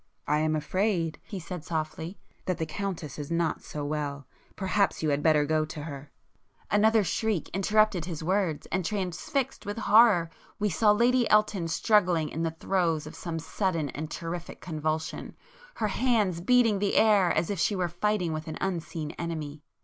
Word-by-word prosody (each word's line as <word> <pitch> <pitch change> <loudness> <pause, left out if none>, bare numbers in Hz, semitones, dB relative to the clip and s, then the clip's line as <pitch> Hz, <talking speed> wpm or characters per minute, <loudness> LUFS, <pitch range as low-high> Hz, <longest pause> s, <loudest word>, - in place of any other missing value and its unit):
"I 150 +1 +2
am 155 0 +1
afraid," 165 0 0
he 200 - -7
said 175 -1 -7
softly—"that 165 +3 -5
the 160 - -1
Countess 160 -4 -5
is 145 - -5
not 170 -1 0
so 150 -1 -6
well,—perhaps 150 +7 -2
you 155 - +2
had 140 +1 +1
better 150 -1 +4
go 155 +1 +1
to 155 -1 -7
her—" 145 -2 -8 0.6
Another 215 +1 +4
shriek 205 0 -1
interrupted 195 -2 +2
his 165 -3 -5
words, 185 -3 0
and 185 +1 0
transfixed 205 - -2
with 205 +1 -5
horror 210 -7 +5 0.3
we 210 -1 0
saw 210 +6 +3
Lady 240 +3 +4
Elton 210 -5 +3
struggling 175 -3 +2
in 160 - -4
the 165 - +1
throes 165 -2 0
of 155 - -9
some 170 -2 -5
sudden 165 -1 -1
and 155 +1 -5
terrific 170 0 -6
convulsion, 155 -1 -3 0.4
her 215 - -1
hands 210 -7 +1
beating 230 -1 +4
the 200 0 0
air 205 -5 +5
as 170 - 0
if 200 - -3
she 205 - +2
were 180 -2 0
fighting 180 0 0
with 155 0 -5
an 155 - -5
unseen 165 -4 -3
enemy. 155 -3 -4
170 Hz, 165 wpm, -28 LUFS, 155-205 Hz, 0.6 s, horror